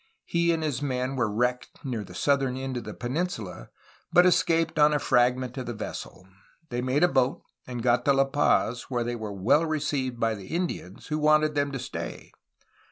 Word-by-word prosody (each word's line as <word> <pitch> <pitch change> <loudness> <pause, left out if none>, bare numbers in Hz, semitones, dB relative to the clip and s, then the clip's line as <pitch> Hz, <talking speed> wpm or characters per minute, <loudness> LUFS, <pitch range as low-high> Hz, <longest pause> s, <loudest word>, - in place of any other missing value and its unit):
He 170 0 +2
and 165 -1 -1
his 145 -4 -2
men 130 -1 -1
were 120 -4 +1
wrecked 125 +3 -2
near 120 -5 -3
the 90 -2 -12
southern 135 +4 +1
end 130 0 -4
of 120 - -5
the - - -6
peninsula, 120 - -4 0.4
but 180 - +6
escaped 165 -3 +2
on 150 0 +5
a - - +4
fragment 125 0 +1
of 125 - -5
the 120 - -4
vessel. 95 -2 -7 0.4
They 120 0 -2
made 130 +5 +1
a - - +7
boat 130 -5 +1 0.2
and 120 -2 -5
got 120 0 +3
to 140 - +5
La 135 0 +4
Paz, 135 -3 +1
where 120 -2 0
they 120 +1 -3
were 110 -3 -5
well 100 - +3
received 140 -6 -1
by 115 -1 +1
the 100 -3 -9
Indians, 160 - -4
who 155 0 -1
wanted 155 0 +4
them 145 -1 0
to - - -2
stay. - - -6
130 Hz, 200 wpm, -27 LUFS, 120-150 Hz, 0.4 s, a